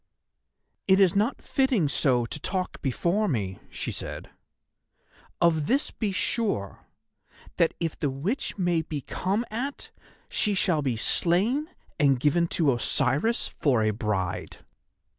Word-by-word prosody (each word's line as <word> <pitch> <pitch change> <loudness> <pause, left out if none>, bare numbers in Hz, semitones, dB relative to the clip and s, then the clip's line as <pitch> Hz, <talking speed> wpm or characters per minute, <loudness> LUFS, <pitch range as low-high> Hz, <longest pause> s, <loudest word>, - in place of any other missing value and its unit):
"It 190 0 +5
is 190 -2 +4
not 215 +6 0
fitting 265 - +1
so 130 -4 +2
to 150 - -6
talk 185 +4 -3
before 170 - 0
me," 100 - -2
she - - -4
said. - - -7 1.1
"Of 160 -3 +2
this 275 +4 +1
be 215 -3 -2
sure, 190 - -2 0.7
that 165 - +2
if 165 -2 -3
the 145 - 0
Witch 165 - -3
may 175 -3 +1
be 150 -2 -5
come 200 - -2
at, 260 +6 -5 0.4
she 210 -1 +1
shall 180 -5 +2
be 130 -5 -1
slain 210 - +2 0.3
and 140 -4 +4
given 160 +5 +2
to 155 -5 +2
Osiris 135 - +2
for 125 -7 +1
a 110 - +2
bride." 105 -4 -3
170 Hz, 135 wpm, -26 LUFS, 135-205 Hz, 1.1 s, It